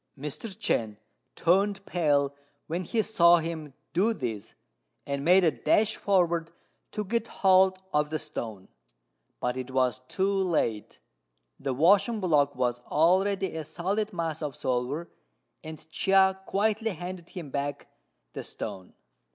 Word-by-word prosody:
Mr. 150 +10 -5
Chên 110 - -1 0.4
turned 195 +3 +2
pale 145 -5 +1 0.3
when 170 +3 -3
he 220 +6 0
saw 175 -5 +5
him 160 -3 -4 0.2
do 210 +7 +2
this, 115 - -5 0.5
and 140 0 -3
made 180 +4 +5
a 165 - +4
dash 215 +6 +2
forward 175 -4 +1 0.4
to 210 - -3
get 230 +3 -1
hold 190 -2 +4 0.2
of 150 0 +2
the 155 - -1
stone; 110 -10 -5 0.7
but 125 0 -1
it 130 0 -5
was 130 -1 +1
too 190 - -2
late, 165 - -1 0.6
the 135 - -2
washing 200 - +4
block 145 -6 +2
was 125 -1 0
already 190 +4 +2
a 160 - -3
solid 190 +8 -2
mass 165 -3 -3
of 150 -3 -4
silver, 130 +6 -2 0.6
and 160 -1 -9
Chia 190 +2 +3
quietly 220 +2 +1
handed 175 0 -7
him 165 -7 -8
back 145 +1 -3 0.5
the - - -5
stone. 95 -1 -7
165 Hz, 135 wpm, -28 LUFS, 140-190 Hz, 0.7 s, saw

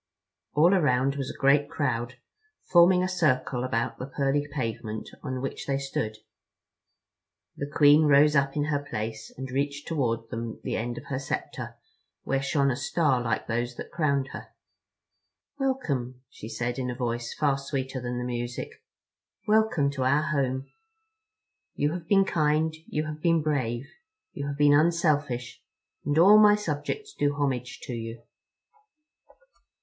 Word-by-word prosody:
All 165 +6 +5
around 135 -6 +2
was 135 -2 -3
a - - -8
great 145 +1 +3
crowd, 125 -4 -2 0.5
forming 180 +1 +5
a - - +1
circle 135 -8 +1
about 115 -1 -2
the 130 - -5
pearly 140 +1 0
pavement 115 -5 -4
on 130 -1 -4
which 135 - -5
they 135 -1 +1
stood. 125 -6 -3 1.4
The 140 - -5
Queen 150 +1 +6
rose 150 +1 +5
up 140 0 +2
in 145 - +2
her 145 -1 0
place 110 -4 -5
and 130 0 -6
reached 140 +2 -2
toward 115 -8 -1
them 115 -1 -5
the - - -2
end 120 +1 -3
of - - -8
her 130 -2 -3
scepter 140 - -5 0.5
where 135 0 0
shone 140 0 +1
a - - -1
star 135 -1 +1
like 115 - -1
those 120 +1 -2
that - - -8
crowned 140 -4 0
her. - - -8 1.1
"Welcome," 140 - -2
she 110 - -9
said 120 +3 -3
in 125 -1 -2
a 125 - -3
voice 120 -1 -3
far 140 -3 +1
sweeter 135 -1 -4
than 120 0 -3
the 125 - -2
music, 120 0 -4 0.8
"Welcome 210 -10 +3
to 140 -2 -5
our 140 +4 +3
Home. 135 -4 -1 1.1
You 145 +1 +1
have 175 -2 -6
been 195 -1 +4
kind, 155 -1 +1
you 155 +1 -2
have 155 0 -6
been 165 -2 +3
brave, 130 -4 -1 0.5
you 140 -1 -4
have 140 0 -4
been 145 0 +5
unselfish, 145 -7 +1 0.4
and 145 +1 0
all 200 +6 +8
my 210 -1 +7
subjects 210 - -4
do 145 0 0
homage 130 -4 -2
to 125 - -5
you." 115 0 -6
140 Hz, 155 wpm, -27 LUFS, 125-150 Hz, 1.4 s, all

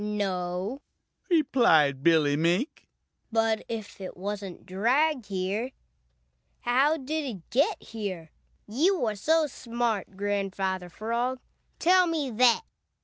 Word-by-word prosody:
"No," 195 +2 -2 0.5
replied 235 - +4
Billy 155 -3 +4
Mink, 175 - 0 0.4
"but 225 -1 +1
if 220 -3 -6
it 185 - -7
wasn't 195 -1 -5
dragged 250 +7 +1
here, 200 +6 -2 0.9
how 270 +6 +3
did 310 +2 -3
it 215 - -7
get 310 - +1
here? 190 -8 -6 0.4
You 295 - +2
are 215 -1 -1
so 320 +10 +2
smart, 235 -7 -3
Grandfather 195 -2 -2
Frog, 235 +6 -2 0.4
tell 365 +1 +4
me 305 -6 -1
that!" 240 - +4
220 Hz, 110 wpm, -27 LUFS, 190-265 Hz, 0.9 s, replied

